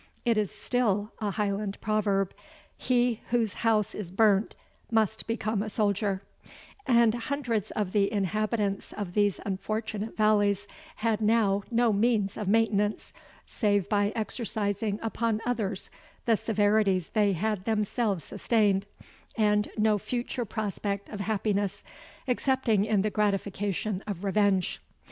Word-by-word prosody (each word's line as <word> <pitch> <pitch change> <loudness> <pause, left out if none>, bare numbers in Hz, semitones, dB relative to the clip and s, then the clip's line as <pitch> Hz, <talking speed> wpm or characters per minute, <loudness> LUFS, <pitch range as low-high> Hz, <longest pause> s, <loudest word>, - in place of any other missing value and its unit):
It 235 -1 +3
is 210 -3 +1
still 210 -4 0
a 210 - -1
Highland 200 0 -2
proverb, 200 -3 0 0.4
He 245 -2 +1
whose 230 -4 +1
house 220 -3 +2
is 205 -5 -6
burnt 200 +1 +3 0.3
must 220 -1 +1
become 220 -2 -1
a 215 - -3
soldier; 200 -2 0 0.6
and 235 -3 +5
hundreds 240 -3 -2
of 205 -4 -2
the 200 -1 +2
inhabitants 210 0 -1
of 200 -4 -5
these 205 -1 +2
unfortunate 215 +2 -3
valleys 205 -2 +3 0.3
had 220 -1 0
now 210 -2 +3
no 235 -1 +3
means 205 -2 +1
of 210 - -4
maintenance, 210 -1 +1 0.3
save 205 -4 +1
by 205 -1 +2
exercising 210 -2 -1
upon 225 -1 0
others 215 -5 -2 0.3
the 230 - +4
severities 205 -4 +2
they 205 -2 +2
had 205 +1 -1
themselves 215 -3 0
sustained, 205 -4 +1 0.5
and 210 -1 +2
no 215 -1 +3
future 245 +2 -3
prospect 200 -2 -3
of 210 - -6
happiness, 200 -1 -1 0.4
excepting 250 -5 +2
in 210 -3 +2
the 215 - 0
gratification 200 -1 -1
of 200 -3 -4
revenge. 200 -2 +1
210 Hz, 125 wpm, -28 LUFS, 200-225 Hz, 0.6 s, and